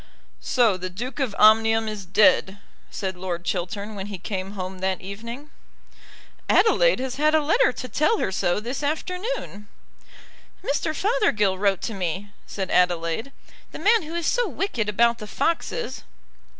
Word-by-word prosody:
"So 230 -7 +2
the 185 0 -5
Duke 245 +10 -6
of 255 -7 -1
Omnium 225 +1 +5
is 210 -3 -5
dead," 190 0 +4 0.3
said 190 -2 -4
Lord 180 -1 -5
Chiltern 200 +4 -3
when 195 -1 -6
he 205 -2 -6
came 190 +1 -5
home 185 -1 -6
that 190 0 -1
evening. 230 +9 -8 1.0
"Adelaide - - +4
has 260 0 -4
had 305 +2 +3
a - - +5
letter 335 +12 +3
to 255 - -6
tell 305 - +2
her - - -1
so 175 0 0
this 240 +6 -5
afternoon." 360 - -3 1.0
"Mr. 300 +2 -1
Fothergill 280 - +1
wrote 200 -2 +1
to 225 - -3
me," 190 +1 -3 0.2
said 190 -2 -4
Adelaide; 175 +7 +1 0.4
"the - - -7
man 445 +2 +4
who 325 +1 -7
is 340 -1 -2
so - - +2
wicked 235 - -2
about 235 +3 +2
the 210 - -7
foxes." 335 - -2
215 Hz, 155 wpm, -24 LUFS, 190-295 Hz, 1.0 s, Omnium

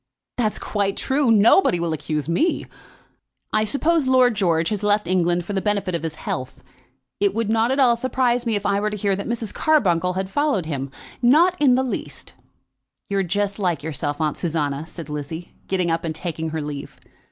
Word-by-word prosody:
"That's 220 -3 0
quite 200 -2 -1
true. 275 -1 +1
Nobody 220 - +5
will 170 -1 -1
accuse 150 -1 -3
me. 300 - +1 0.9
I 215 0 +3
suppose 300 +5 +1
Lord 255 -2 +5
George 170 -5 +1
has 210 -2 -2
left 210 0 +2
England 175 -1 +1
for 205 - -4
the 195 - 0
benefit 200 -3 -1
of 170 - -1
his 160 -1 -4
health. 130 -3 -5 0.6
It 200 0 +1
would 225 -1 0
not 225 +1 +2
at 265 +2 0
all 245 -3 +5
surprise 245 0 0
me 225 - +1
if 205 0 -3
I 200 0 +2
were 210 +1 0
to 210 - -5
hear 200 -1 +1
that 200 - -5
Mrs. 235 -2 -3
Carbuncle 180 - +2
had 190 +1 -2
followed 285 - +1
him; 140 -3 -4 0.3
not 315 +9 +5
in 265 -4 +5
the 260 - +2
least." 255 - -6 0.8
"You're 200 -1 +1
just 200 +3 -1
like 175 -7 -1
yourself, 145 -1 -3
Aunt 155 -2 -1
Susanna," 155 -3 -2
said 165 -3 -9
Lizzie, 150 +3 -6
getting 180 -3 0
up 165 0 -1
and 160 -2 -3
taking 160 -1 -4
her 160 -1 -3
leave. 145 -1 -7
200 Hz, 195 wpm, -22 LUFS, 165-235 Hz, 0.9 s, Nobody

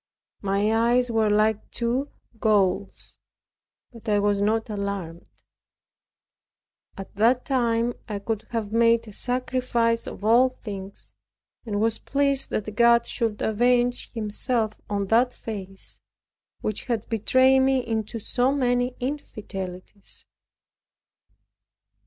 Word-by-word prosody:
My 200 +2 +1
eyes 240 +2 +2
were 220 -1 +2
like 215 0 +1
two 245 +4 -1 0.3
coals; 200 -3 0 0.7
but 230 -1 -8
I 205 - +3
was 205 0 +1
not 220 +2 +1
alarmed. 200 -5 -5 1.7
At 195 0 -9
that 240 +4 +3
time 235 -3 +1 0.2
I 210 - -2
could 210 +1 -4
have 225 -3 -3
made 230 0 +3
a - - -9
sacrifice 245 -1 0
of - - -8
all 240 +4 +5
things, 200 -5 -9 0.5
and 205 -2 -1
was 225 +1 +1
pleased 280 -1 +1
that 215 0 -3
God 235 +1 +5
should 225 -3 -2
avenge 245 +2 +2
Himself 220 0 0 0.2
on 200 -1 -1
that 245 +2 +3
face, 195 -3 -7 0.6
which 215 - -2
had 230 -3 -2
betrayed 260 +4 +4
me 265 -1 +2
into 220 -1 -3
so 245 +4 0
many 250 -2 +1
infidelities. 200 -8 -6
225 Hz, 115 wpm, -25 LUFS, 205-245 Hz, 1.7 s, all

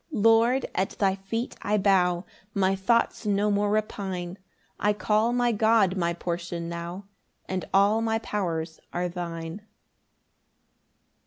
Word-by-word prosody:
10 220 -8 -2
Lord, 230 +3 +4
at 190 - -1
thy 195 -2 +3
feet 195 +5 -4
I 210 +1 +1
bow, 185 -3 +2 0.3
My 195 -1 +2
thoughts 220 +3 +1
no 205 +1 +2
more 205 0 +1
repine; 190 -4 -2 0.4
I 210 0 +2
call 215 +2 +1
my 245 0 +2
God 220 -3 +3
my 170 -2 0
portion 170 0 -4
now, 170 +3 -6 0.4
And 185 -1 -3
all 200 +3 +4
my 225 0 +1
powers 170 -7 -3
are 180 +1 -1
thine. 170 +1 -5
195 Hz, 135 wpm, -26 LUFS, 175-215 Hz, 0.4 s, Lord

